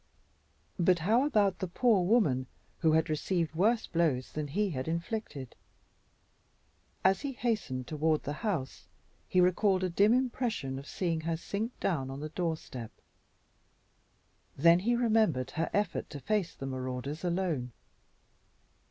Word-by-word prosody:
But 180 +1 +4
how 235 +7 +4
about 210 -8 +2
the 185 - -2
poor 210 +1 +3
woman 175 - +2 0.3
who 160 -2 +3
had 160 +1 +3
received 165 +1 -1
worse 215 +7 +2
blows 155 -7 0
than 150 -1 -3
he 200 +7 0
had 130 -2 -4
inflicted? 165 - -4 1.5
As 190 0 +4
he 280 -2 -3
hastened 215 - -2
toward 155 +2 0
the 145 - -3
house 175 - -3 0.4
he 185 - +3
recalled 185 +1 +3
a 185 - 0
dim 200 +5 +4
impression 235 - -1
of 140 - -11
seeing 165 -3 -1
her 165 0 -2
sink 215 +8 -4
down 135 -8 -1
on 135 +1 -6
the 155 +1 -5
doorstep. 160 -9 -4 1.7
Then 170 +4 +6
he 235 +6 +1
remembered 220 - +2
her 165 +1 -1
effort 205 -3 -1
to 145 - -7
face 205 +2 -1
the 135 - -7
marauders 130 +3 -4
alone. 170 -8 -1
170 Hz, 140 wpm, -31 LUFS, 145-210 Hz, 1.7 s, Then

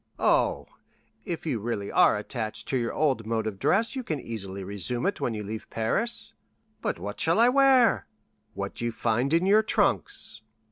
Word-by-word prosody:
"Oh, - - +2 0.6
if 170 -5 -4
you 130 -8 -1
really 105 -2 -3
are - - +5
attached 110 0 -4
to 135 - +1
your 115 -1 -1
old 135 -8 0
mode 115 -1 -1
of 105 -3 -4
dress; 225 - +2
you 260 - -2
can 155 - -3
easily 100 -5 -6
resume 100 - -3
it 200 - -1
when 115 - -1
you 105 - -4
leave 110 +2 -7
Paris." 155 - 0 0.5
"But - - -2
what - - -6
shall - - +2
I 235 +1 +6
wear?" 265 -3 +4 0.5
"What - - -5
you 120 0 -1
find 120 +4 0
in 165 +3 +3
your 210 +3 +5
trunks." 115 - 0
120 Hz, 180 wpm, -27 LUFS, -, 0.6 s, I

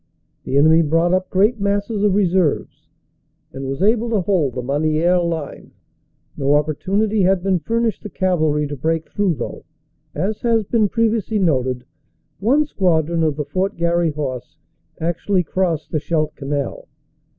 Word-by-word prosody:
The 135 - 0
enemy 160 +3 +5
brought 165 +3 +2
up 185 0 0
great 210 +5 +2
masses 200 +1 -1
of 205 -2 +2
reserves, 185 -5 0 0.6
and 135 0 -5
was 135 +5 -3
able 225 +3 +2
to 220 -4 +1
hold 170 - 0
the 125 - -3
Masnieres 155 +6 +1
line. 165 -4 -5 0.6
No 140 +1 +2
opportunity 195 +8 0
had 185 -1 +2
been 190 -2 +1
furnished 230 +2 -1
the 210 - -7
cavalry 155 -6 +1
to 145 0 -5
break 160 +3 -2
through 200 -5 +1
though, - - -6 0.5
as 195 +8 -1
h?,s 230 -2 +1
been 215 0 +1
previously 225 -1 0
noted, 130 -9 0 0.5
one 270 +9 +3
squadron 170 - +1
of 155 -3 +1
the 150 0 -3
Fort 185 +7 -2
Garry 170 0 +1
Horse 140 -5 -5 0.4
actually 175 +3 0
crossed 170 -2 -1
the 155 - 0
Scheldt 155 0 -1
Canal. 140 -2 -4
170 Hz, 150 wpm, -20 LUFS, 150-200 Hz, 0.6 s, enemy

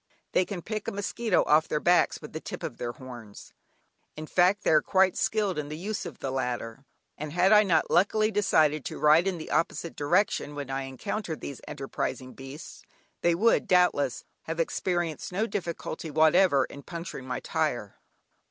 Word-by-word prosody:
They 185 - +3
can 180 -4 -6
pick 215 -1 -4
a - - -1
mosquito 205 +1 0
off 155 +1 +4
their 150 - -1
backs 175 +3 +2
with - - -9
the - - -4
tip - - -7
of - - -5
their 120 0 -4
horns, 120 -6 -11 0.6
in 155 - -6
fact 185 +5 +2
they - - +2
are 155 -1 +6
quite 190 -1 +3
skilled 205 -6 0
in 145 -1 -5
the 150 - -5
use 200 +5 -4
of - - -9
the 135 - -4
latter, 125 -1 -3 0.3
and 150 0 -5
had 180 +2 +3
I 210 - +8
not 180 -6 +1
luckily 215 +3 +3
decided 155 -8 +2
to - - -5
ride 155 +5 +5
in 190 -2 -1
the 160 - -8
opposite 170 0 -1
direction 150 -1 +1
when 140 -2 -5
I 135 0 -2
encountered 165 - -4
these 140 - -7
enterprising 130 -1 -4
beasts, 135 +3 -10 0.4
they 170 -1 +3
would, 225 +6 +3
doubtless, 180 -8 +2 0.2
have 165 +1 -4
experienced 175 -1 -1
no 200 +5 0
difficulty 170 -5 -4
whatever 155 -1 +4
in 140 - -11
puncturing 165 -5 -7
my 125 - -2
tyre! - - -2
165 Hz, 180 wpm, -28 LUFS, 140-190 Hz, 0.6 s, I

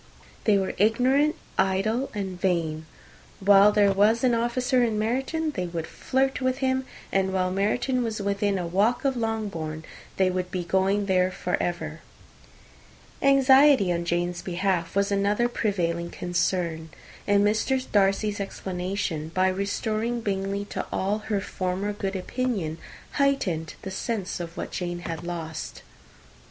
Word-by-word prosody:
They 210 -2 +5
were 190 -1 -1
ignorant, 255 +8 +3 0.2
idle, 195 +7 +1
and 190 -3 -4
vain. 160 -4 0 0.5
While 200 +1 +6
there 205 -1 +4
was 210 +5 +3
an 250 -2 +4
officer 245 +2 +1
in 225 -3 0
Meryton, 270 +9 -1
they 180 -9 -3
would 170 -2 -4
flirt 265 +7 -1
with 255 0 +1
him; 260 -1 0 0.2
and 190 0 +1
while 185 -1 0
Meryton 240 +7 0
was 220 -2 -3
within 200 0 0
a 180 - -2
walk 205 +10 +1
of 270 -1 +2
Longbourn, 205 -9 -3 0.3
they 190 -1 +3
would 180 0 -2
be 180 -1 -3
going 190 +3 +1
there 185 -1 +2
for 180 -1 -2
ever. 160 -3 -3 1.2
Anxiety 270 -6 +6
on 170 0 -2
Jane's 175 +1 -1
behalf 180 -1 -1
was 200 0 +2
another 205 +4 +2
prevailing 170 -7 -1
concern; 175 -2 -1 0.4
and 205 0 +4
Mr. 220 +5 +2
Darcy's 205 +1 +2
explanation, 185 -4 -3
by 185 0 +3
restoring 215 +4 -1
Bingley 200 -1 -2
to - - -2
all 200 +3 0
her 210 -1 -2
former 190 +2 -2
good 195 -1 -3
opinion, 190 -5 -2 0.3
heightened 210 - 0
the 190 - -5
sense 195 -1 -3
of 170 -1 -7
what - - -4
Jane 175 -1 -3
had 165 -2 -5
lost. 165 -2 -6
195 Hz, 145 wpm, -26 LUFS, 180-225 Hz, 1.2 s, While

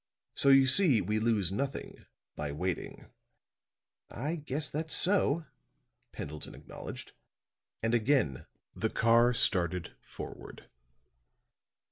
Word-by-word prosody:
So 140 - +4
you 135 0 +7
see, 140 - +4
we 105 +3 -1
lose 110 -5 +2
nothing 135 +7 -4 0.3
by 75 -1 -4
waiting." 90 +5 -4 1.0
"I 145 +9 -3
guess 150 -2 -3
that's 160 +2 -3
so," 170 -5 +2 0.7
Pendleton 75 +1 -7
acknowledged, - - -9 0.7
and 115 +1 +1
again 115 - +1 0.3
the - - -1
car 115 +2 +4
started 90 -7 +2
forward. - - -10
120 Hz, 100 wpm, -31 LUFS, 95-145 Hz, 1.0 s, you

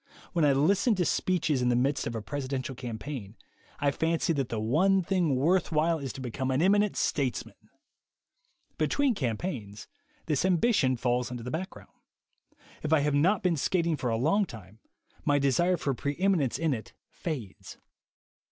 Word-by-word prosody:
When 170 -3 +2
I 145 - +5
listen 195 - +3
to 180 -2 0
speeches 160 -8 +1
in 125 - +2
the 120 - +3
midst 135 +4 +1
of 115 - -4
a 110 - -4
presidential 135 0 -4
campaign, 120 -3 -6 0.4
I 140 0 +2
fancy 165 +2 0
that 135 -4 -2
the 115 - -2
one 180 - +3
thing 175 -6 +1
worth 170 +8 +2
while 160 +1 +2
is 135 -3 -4
to 135 - -8
become 130 +2 -3
an 130 +1 +1
eminent 205 +4 +3
statesman. 135 -4 -2 1.1
Between 285 -3 +2
campaigns, 115 - -4 0.4
this 150 -2 0
ambition 180 - +2
falls 125 +1 0
into 120 -2 -6
the 125 - -5
background. 185 +6 -6 0.9
If 155 - -3
I 160 -2 +5
have 145 0 +1
not 180 +8 +3
been 180 -2 +2
skating 170 +2 +1
for 125 -4 -2
a 115 - 0
long 180 - +2
time, 110 -1 -12 0.4
my 145 -1 +3
desire 155 +7 +2
for 140 -3 -1
preem 140 +4 -4 0.2
inence 140 -8 0
in 160 -3 +1
it 110 -3 -7 0.2
fades. 135 - -6
145 Hz, 170 wpm, -28 LUFS, 125-170 Hz, 1.1 s, I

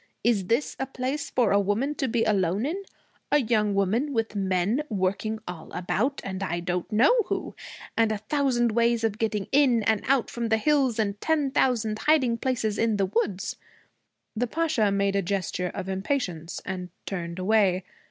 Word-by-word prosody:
Is 210 -5 +2
this 235 +7 0
a 265 - -2
place 270 +2 -3
for 240 -5 +2
a 200 - +5
woman 205 +9 0
to 275 -2 -2
be 230 -1 +1
alone 195 +1 +1
in 350 +7 -2 0.5
a 295 - +6
young 215 -6 +1
woman, 225 +9 +1
with 225 -3 -1
men 195 +5 +1
working 200 +2 -1
all 165 -3 -8
about, 225 +10 -1
and 190 0 -5
I 175 -3 -1
don't 175 0 -3
know 235 - +5
who, - - -3 0.4
and 225 -1 +3
a 215 - -1
thousand 240 +1 +1
ways 235 +1 +2
of 220 -1 0
getting 215 -3 -1
in 260 -5 +4
and 220 -1 +2
out 265 -2 +2
from 235 -1 -3
the 220 - +3
hills, 270 -1 +2
and 205 -2 -1
ten 300 -4 +1
thousand 225 -5 +1
hiding 260 -7 +2
places 230 -5 -1
in 225 -2 +2
the 195 - +2
woods?' 195 -1 -1 0.8
The 245 +3 0
Pasha 290 -8 +1
made 200 0 +1
a 200 - +2
gesture 180 -1 -2
of 195 -2 -4
impatience, 190 - -2
and 180 -1 -4 0.2
turned 170 -3 -4
away. 190 -1 +2
220 Hz, 180 wpm, -26 LUFS, 195-250 Hz, 0.8 s, a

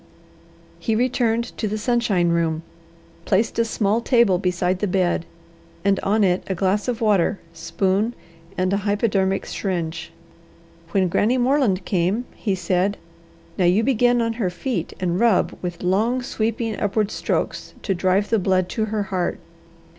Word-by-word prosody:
He 225 - 0
returned 235 -1 0
to 215 - 0
the 210 +1 -2
sunshine 215 -7 +1
room, 165 -1 0 0.6
placed 215 +4 +1
a - - +5
small 220 0 0
table 235 -7 +3
beside 180 0 0
the 205 - 0
bed, 180 -3 0 0.6
and 200 -1 +3
on 210 +2 +1
it 180 -1 +2
a 190 - -1
glass 195 +4 0
of 240 -1 -2
water, 205 -4 +2 0.2
spoon, 185 +7 0 0.4
and 185 +1 +1
a - - +3
hypodermic 200 -1 0
syringe. 170 -4 -3 0.8
When 190 0 +2
Granny 220 +8 +2
Moreland 245 -8 +2
came 190 +6 0
he 200 -4 -1
said: 185 +2 0 0.6
"Now 180 - +3
you 185 +6 +4
begin 245 -1 +3
on 230 0 -1
her 185 - +1
feet 180 - -3
and 180 -1 0
rub 230 -5 +3
with 175 -1 -5
long, 220 +8 +1
sweeping, 225 -1 -2
upward 210 0 0
strokes - - -2
to 195 - 0
drive 185 +3 +1
the 225 - +3
blood 185 -1 +1
to 220 +2 -1
her 215 -1 -2
heart." 180 -2 0
200 Hz, 155 wpm, -22 LUFS, 180-225 Hz, 0.8 s, a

